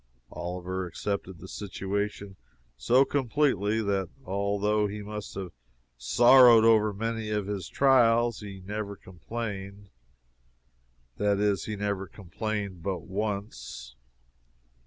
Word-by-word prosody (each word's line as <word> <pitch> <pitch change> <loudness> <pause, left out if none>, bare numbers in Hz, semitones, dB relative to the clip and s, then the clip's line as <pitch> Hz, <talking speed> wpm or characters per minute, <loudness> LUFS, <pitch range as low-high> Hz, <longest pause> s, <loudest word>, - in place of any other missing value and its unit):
Oliver 90 +1 -4
accepted 95 +1 -4
the 95 - -11
situation 100 0 -4 0.4
so 125 - +4
completely 120 -6 +1
that 100 -2 -1 0.2
although 100 +2 0
he 105 +1 -6
must 105 0 -7
have 95 -3 -5 0.4
sorrowed 120 - +7
over 110 -2 +5
many 110 +1 -3
of 105 -2 -1
his 100 -2 -4
trials, 120 -4 +4
he 100 -2 -9
never 100 +1 -5
complained 100 +1 -7 1.3
that 100 0 +1
is, 105 -1 +1
he 110 - -4
never 100 -1 -2
complained 100 -1 -5
but 90 -1 -3
once. 95 - -5
100 Hz, 110 wpm, -28 LUFS, 95-110 Hz, 1.3 s, sorrowed